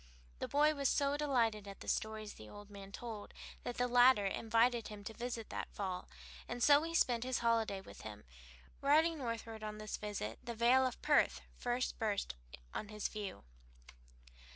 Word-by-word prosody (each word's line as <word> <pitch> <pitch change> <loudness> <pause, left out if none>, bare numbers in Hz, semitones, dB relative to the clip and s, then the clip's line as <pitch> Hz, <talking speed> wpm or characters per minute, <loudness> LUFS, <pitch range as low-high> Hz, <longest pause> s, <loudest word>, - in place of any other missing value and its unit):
The - - -2
boy 300 +2 +4
was 280 -2 +1
so 280 0 +2
delighted 235 -8 +1
at 195 - -9
the - - -9
stories 220 -1 -2
the 110 - -12
old 205 0 -11
man 200 -1 -9
told 220 -2 -7 0.3
that 245 - -4
the 245 - +2
latter 245 -3 +6
invited 230 +3 +2
him 210 -1 -8
to 225 - -6
visit 235 0 -3
him 220 - -15
that - - -4
fall, 185 -3 -3 0.4
and 240 0 -2
so 290 0 +7
he 330 +1 -3
spent 240 -7 +3
his 255 0 0
holiday 225 -4 +2
with 190 - -12
him. 105 -1 -8 0.6
Riding 315 +3 +4
northward 230 -3 -4
on 210 0 -4
this 215 0 -4
visit 200 - -4
the 235 0 -5
vale 250 +3 +5
of 250 - -6
Perth - - +4
first 245 +1 -1
burst 210 - 0 0.4
on 215 - -4
his 210 0 -3
view. 205 - -6
230 Hz, 180 wpm, -36 LUFS, 210-250 Hz, 0.6 s, so